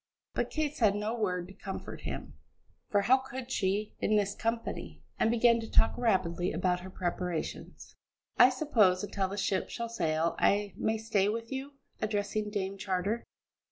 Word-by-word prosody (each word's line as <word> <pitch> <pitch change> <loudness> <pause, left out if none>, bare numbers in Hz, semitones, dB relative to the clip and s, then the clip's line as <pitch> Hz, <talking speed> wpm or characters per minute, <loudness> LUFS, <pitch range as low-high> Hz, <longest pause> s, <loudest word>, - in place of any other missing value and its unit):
But - - -1
Kate 305 -2 -1
said 210 -4 +3
no 210 +2 -1
word 180 -6 -1
to 195 - -12
comfort 195 0 -7
him - - -5 0.6
for 205 - +3
how 250 +6 +5
could 260 -1 -7
she 205 -1 0
in 215 - +2
this 200 -1 +2
company? 230 +2 -3 0.2
and - - +3
began 235 0 +4
to 225 - -6
talk - - +4
rapidly 185 -7 +1
about 180 -1 +1
her 185 +1 -9
preparations. 180 -2 -4 0.4
"I 245 - +8
suppose 225 -10 +3
until 200 -1 -1
the 200 +2 -6
ship 195 -1 0
shall 235 -1 -4
sail 165 -6 0
I 205 0 +2
may 220 0 0
stay 210 -3 +1
with 230 +1 -3
you?" 270 +2 -4 0.3
addressing 210 0 -1
Dame 195 -1 -3
Charter. 195 +4 -1
205 Hz, 165 wpm, -31 LUFS, 190-230 Hz, 0.6 s, I